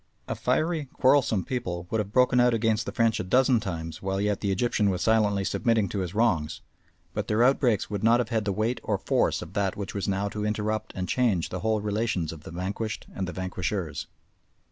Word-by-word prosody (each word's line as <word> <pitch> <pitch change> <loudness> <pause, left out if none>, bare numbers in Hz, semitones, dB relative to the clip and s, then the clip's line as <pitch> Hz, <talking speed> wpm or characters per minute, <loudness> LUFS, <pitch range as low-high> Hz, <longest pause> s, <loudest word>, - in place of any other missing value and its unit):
A - - -1
fiery, 160 -2 0
quarrelsome 130 -7 +3
people 90 -9 -3
would 110 - +1
have 105 -1 -3
broken 125 +1 +4
out 125 -1 +4
against 110 0 +1
the - - -2
French 115 -2 +2
a - - -1
dozen 125 +5 +3
times 85 -6 -5
while 95 0 -1
yet 105 0 0
the 100 - 0
Egyptian 105 +1 +1
was 90 -2 -1
silently 105 -3 +3
submitting 110 +1 +1
to 100 - -3
his 90 0 -4
wrongs, 85 -10 +1 0.5
but - - -3
their 110 +2 +3
outbreaks 125 -4 +3
would 100 -1 -3
not 115 +2 +5
have 125 - -1
had 110 -3 0
the 100 - +1
weight 110 +5 -1
or - - -1
force - - +1
of - - -12
that 100 -2 0
which 100 -1 -5
was 100 - -3
now 100 +1 0
to 105 +1 -4
interrupt 110 0 -1
and 90 -1 -3
change 105 -7 +1
the 90 - -4
whole 110 +2 0
relations 105 -5 -1
of 80 - -11
the 80 - -10
vanquished 100 +5 -4
and 95 -1 -3
the - - -4
vanquishers. 95 -2 -3
105 Hz, 215 wpm, -27 LUFS, 95-115 Hz, 0.5 s, not